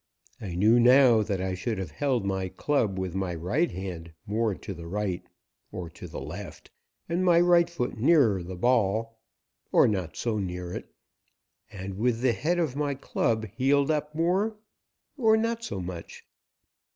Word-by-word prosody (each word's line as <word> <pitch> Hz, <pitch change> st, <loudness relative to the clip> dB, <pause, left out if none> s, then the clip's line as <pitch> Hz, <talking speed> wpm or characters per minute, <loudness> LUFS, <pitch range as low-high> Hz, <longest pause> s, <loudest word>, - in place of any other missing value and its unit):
I 95 Hz, -5 st, -5 dB
knew 110 Hz, +6 st, +5 dB
now 125 Hz, -2 st, +6 dB
that 100 Hz, -3 st, -2 dB
I 95 Hz, 0 st, -2 dB
should 105 Hz, +4 st, -3 dB
have 95 Hz, -1 st, -5 dB
held 130 Hz, -7 st, 0 dB
my 95 Hz, -1 st, -1 dB
club 115 Hz, -5 st, 0 dB
with 95 Hz, -2 st, -3 dB
my 95 Hz, -2 st, -2 dB
right 110 Hz, -, 0 dB
hand 85 Hz, -3 st, -7 dB
more 110 Hz, 0 st, 0 dB
to 100 Hz, -, -7 dB
the 85 Hz, -1 st, -9 dB
right 95 Hz, -1 st, -2 dB, 0.5 s
or 85 Hz, -2 st, -6 dB
to -, -, -10 dB
the -, -, -7 dB
left -, -, -8 dB, 0.4 s
and 175 Hz, +2 st, 0 dB
my 175 Hz, -2 st, +5 dB
right 175 Hz, -1 st, +5 dB
foot 125 Hz, -9 st, -3 dB
nearer 120 Hz, -, +4 dB
the 90 Hz, +2 st, -7 dB
ball 115 Hz, +1 st, +1 dB, 0.5 s
or -, -, +6 dB
not 95 Hz, -6 st, -2 dB
so 115 Hz, -3 st, -1 dB
near 90 Hz, -2 st, -4 dB
it -, -, -7 dB, 0.8 s
and 95 Hz, -1 st, -7 dB
with 120 Hz, 0 st, +1 dB
the 125 Hz, -2 st, +3 dB
head 165 Hz, +10 st, 0 dB
of 160 Hz, -7 st, 0 dB
my 145 Hz, -1 st, -1 dB
club 115 Hz, -4 st, -1 dB
heeled 140 Hz, +3 st, +3 dB
up 150 Hz, 0 st, -2 dB
more 190 Hz, +7 st, +1 dB, 0.6 s
or 220 Hz, -4 st, +4 dB
not 230 Hz, +1 st, -1 dB
so 160 Hz, -, -4 dB
much. 90 Hz, -2 st, -8 dB
115 Hz, 170 wpm, -27 LUFS, 95-145 Hz, 0.8 s, now